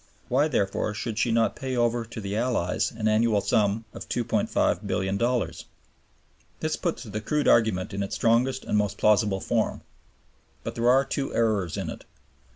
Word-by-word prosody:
Why, 140 +5 +3
therefore, 105 -5 -1
should 110 +1 -3
she 120 - +2
not 115 0 +2
pay 130 -1 -3
over 120 0 +1
to 115 0 -8
the 100 -1 -4
Allies 115 -6 0
an 110 -1 -2
annual 110 0 +3
sum 105 +1 +1
of - - -9
$2,500,000,000? 105 +5 0 0.9
This 155 0 -1
puts 170 -6 -3
the 105 -2 -5
crude 150 +7 0
argument 105 -5 +3
in 100 - -2
its 100 - -3
strongest 125 +3 +2
and 105 - +1
most 105 -2 -1
plausible 105 -2 +3
form. - - -1 0.8
But - - -4
there 120 +1 +1
are 135 +2 +5
two 135 0 -3
errors 105 -7 +1
in - - -3
it. - - -10
115 Hz, 165 wpm, -26 LUFS, 105-120 Hz, 0.9 s, are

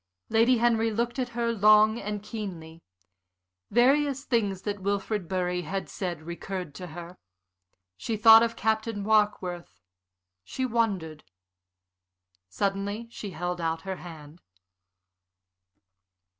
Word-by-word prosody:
Lady 235 +3 +4
Henry 230 -1 +2
looked 235 +4 -2
at 250 -1 -1
her 235 -1 +1
long 215 +1 +5
and 210 -1 -5
keenly. 175 -7 -7 0.9
Various 275 +4 +3
things 205 -8 -1
that 205 -1 -3
Wilfrid 200 -1 -2
Bury 180 -1 -1
had 190 +4 -4
said 175 -5 -5
recurred 170 0 -6
to 180 +5 -8
her. 175 +2 -9 0.8
She 220 - -3
thought 225 +1 +9
of 230 0 0
Captain 220 -1 -1
Warkworth. 190 - 0 0.6
She 260 - -3
wondered. 195 -10 -1 1.3
Suddenly 200 - -2
she 210 - -7
held 175 0 -4
out 165 0 -1
her 190 0 -5
hand. 160 -1 -12
200 Hz, 115 wpm, -27 LUFS, 175-225 Hz, 1.3 s, thought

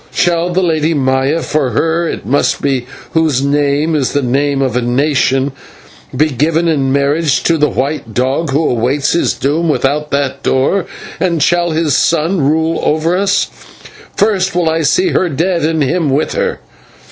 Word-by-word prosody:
Shall 170 0 +1
the 185 +2 0
Lady 160 -1 +1
Maya 135 +3 0
for 150 -4 0
her 165 +5 0
it - - -6
must 135 +6 +1
be 130 -3 -1 0.2
whose 155 -5 +1
name 145 +2 +1
is 140 -4 0
the 145 - 0
name 140 +3 0
of 130 -3 -1
a 125 - +1
nation 135 +2 +1 0.7
be 155 +2 +2
given 160 +6 +1
in 140 -5 +1
marriage 140 +2 +1
to 170 - +2
the 150 -1 +2
white 135 -3 -3
dog 130 +7 -1
who 145 +4 +1
awaits 125 +4 0
his 170 - +1
doom 160 +4 -1
without 150 +1 0
that 140 -1 -2
door, 160 +10 0 0.3
and 170 -5 +1
shall 175 +1 +2
his 160 -3 0
son 165 +2 +1
rule 160 +3 +1
over 160 +3 +1
us? 200 +1 +1 0.7
First 195 -3 +1
I - - +2 0.2
will - - -1
see 365 - +2
her 185 - +1
dead 170 +4 -1
and 155 0 +1
him 160 +2 0
with 140 +3 0
her!" - - -2
150 Hz, 170 wpm, -14 LUFS, 135-165 Hz, 0.7 s, be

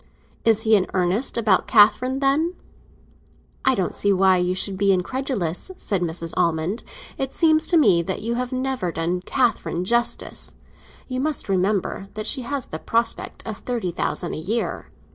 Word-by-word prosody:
"Is 225 -1 +3
he 220 -1 +5
in 190 -2 +2
earnest 185 +8 +1
about 215 -5 +2
Catherine, 250 +5 +4
then?" 305 +6 +1 1.1
"I 265 -1 +3
don't 190 -3 -2
see 205 - +2
why 190 -1 +4
you 180 +1 0
should 195 +1 0
be 195 +1 +2
incredulous," 190 - -2
said 195 -4 -1
Mrs. 165 -1 -2
Almond. 170 +5 0 0.4
"It 270 0 -2
seems 315 -2 +3
to 345 - +4
me 200 - +5
that 190 +4 -3
you 230 +1 -1
have 250 +1 -3
never 255 -8 -2
done 170 +2 -2
Catherine 215 -5 0
justice. 235 +3 0 0.5
You 255 -1 -3
must 300 0 -1
remember 195 0 0
that 215 0 -4
she 260 +4 +2
has 275 +1 -3
the 155 - -7
prospect 230 +4 -2
of 220 -2 -5
thirty 235 -8 -3
thousand 175 0 -2
a - - -4
year." 215 +9 -3
210 Hz, 165 wpm, -22 LUFS, 180-255 Hz, 1.1 s, he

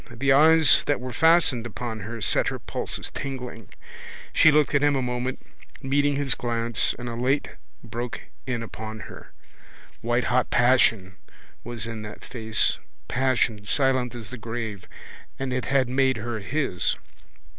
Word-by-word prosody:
The 135 +3 +1
eyes 155 0 +6
that 145 - +1
were 125 0 -6
fastened 160 -5 +3
upon 115 0 -6
her 110 +3 -7
set - - +3
her - - -2
pulses - - -4
tingling. 125 -6 -6 0.6
She 155 - +6
looked 150 -1 +3
at 140 - +3
him 145 -1 +3
a 135 - 0
moment, 125 +1 -3 0.3
meeting 145 +1 +1
his 140 -2 +2
glance, 115 -1 +1
and 120 0 -7
a 120 - -4
light 130 +5 0 0.3
broke 120 +1 -5 0.3
in 120 -3 -2
upon 110 -1 -7
her. - - -11 0.7
Whitehot 120 +1 +1
passion 115 -7 +3 0.5
was 120 -2 -5
in 115 -1 -6
that 105 0 -9
face, 110 -3 +2 0.3
passion 120 -4 0
silent 130 +1 +1
as 115 -2 -8
the 130 - -7
grave, 110 -3 -5 0.5
and 135 -1 -3
it 130 - -2
had 135 -2 +2
made 130 0 +1
her 115 0 -4
his. 130 - -1
125 Hz, 150 wpm, -25 LUFS, 115-135 Hz, 0.7 s, eyes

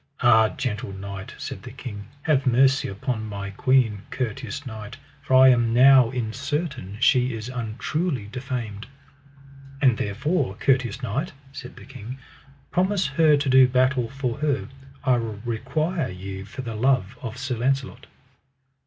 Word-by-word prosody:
Ah, 110 -2 +5
gentle 110 -6 -4
knight, 95 0 -7
said - - -6
the - - -9
king, 105 -4 -8 0.2
have 140 -4 +2
mercy 130 +2 +4
upon 110 +3 -3
my 100 -1 -5
queen, 115 -2 +2
courteous 125 +1 -4
knight, 110 0 -8 0.2
for 135 -2 +1
I 130 0 +8
am 120 -2 +3
now 130 -1 +7
in 115 -3 -3
certain 140 - -4
she 125 -1 +3
is 110 +2 -6
untruly 125 - -2
defamed. 115 -3 -5 0.9
And 130 -5 +3
therefore, 105 - -1
courteous 130 +1 0
knight, 135 - -2 0.2
said 140 -1 -9
the - - -13
king, 130 -1 -9 0.5
promise 190 +1 +1
her 155 0 +4
to 140 0 -2
do 130 0 +7
battle 130 -1 +2
for 135 -2 -3
her, 145 -3 -1 0.3
I 130 -3 +3
require 120 - -2
you 95 +1 -7
for 130 +6 -8
the 115 -2 -5
love 120 -2 +1
of 120 -1 -6
Sir 125 -1 -3
Launcelot. 130 +1 -1
125 Hz, 145 wpm, -24 LUFS, 110-135 Hz, 0.9 s, I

